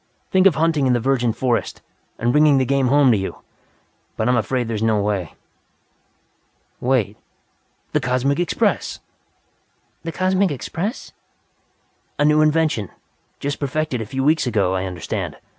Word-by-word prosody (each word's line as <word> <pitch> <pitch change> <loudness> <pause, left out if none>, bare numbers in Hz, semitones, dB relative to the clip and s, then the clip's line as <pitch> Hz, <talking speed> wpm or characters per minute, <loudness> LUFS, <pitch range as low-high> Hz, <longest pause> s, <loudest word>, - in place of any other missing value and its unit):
Think 190 0 +5
of 180 - +3
hunting 155 -3 +2
in 125 - +3
the 120 - +2
virgin 125 -1 +1
forest, 120 +1 -2 0.3
and 120 +1 0
bringing 150 0 +5
the 130 - +2
game 135 0 +1
home 140 0 +5
to 110 - +3
you! 95 - -6 0.7
But 110 - 0
I'm 125 - +3
afraid 120 +1 0
there 115 - -3
is 110 - -3
no 110 -1 +2
way. 100 -8 -2 1.4
Wait! 120 -5 0 0.7
The - - +1
Cosmic 130 +4 0
Express." 175 -3 0 1.0
"The 165 - -5
Cosmic 185 +2 +1
Express?" 170 - -4 1.1
"A 145 - +2
new 150 +1 +4
invention. 155 - +1 0.5
Just 145 0 -3
perfected 140 -2 -2
a 110 - -5
few 135 +3 -2
weeks 155 -1 +2
ago, 100 -6 +1
I 95 0 -1
understand. 90 -3 -4
130 Hz, 150 wpm, -21 LUFS, 115-155 Hz, 1.4 s, Think